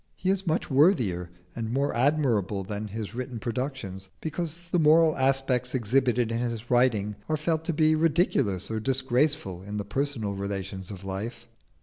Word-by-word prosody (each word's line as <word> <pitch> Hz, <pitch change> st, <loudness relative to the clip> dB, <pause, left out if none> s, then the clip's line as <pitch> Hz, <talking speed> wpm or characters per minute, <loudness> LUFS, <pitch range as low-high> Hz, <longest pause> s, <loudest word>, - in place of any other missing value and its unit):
He 185 Hz, -, 0 dB
is 195 Hz, -1 st, -1 dB
much 160 Hz, +1 st, 0 dB
worthier 120 Hz, -, +3 dB, 0.3 s
and 115 Hz, -1 st, -3 dB
more 140 Hz, +3 st, 0 dB
admirable 120 Hz, -8 st, +1 dB
than 105 Hz, +2 st, -4 dB
his 105 Hz, 0 st, -5 dB
written 125 Hz, 0 st, -4 dB
productions, 115 Hz, -6 st, -4 dB
because 165 Hz, +1 st, -4 dB
the 175 Hz, -, +3 dB
moral 160 Hz, 0 st, +5 dB
aspects 130 Hz, -2 st, +1 dB
exhibited 125 Hz, 0 st, +2 dB
in 115 Hz, -, -1 dB
his 120 Hz, -1 st, -3 dB
writing 110 Hz, -5 st, +2 dB
are 155 Hz, -, +1 dB
felt 160 Hz, +1 st, 0 dB
to 170 Hz, -, 0 dB
be 155 Hz, 0 st, +4 dB
ridiculous 150 Hz, -, +1 dB
or 110 Hz, -, -1 dB
disgraceful 130 Hz, -, 0 dB
in 100 Hz, +2 st, -6 dB
the 100 Hz, -, -3 dB
personal 135 Hz, -7 st, -2 dB
relations 95 Hz, -1 st, -4 dB
of 100 Hz, -2 st, -8 dB
life. 95 Hz, +5 st, -5 dB
125 Hz, 160 wpm, -27 LUFS, 105-145 Hz, 0.3 s, moral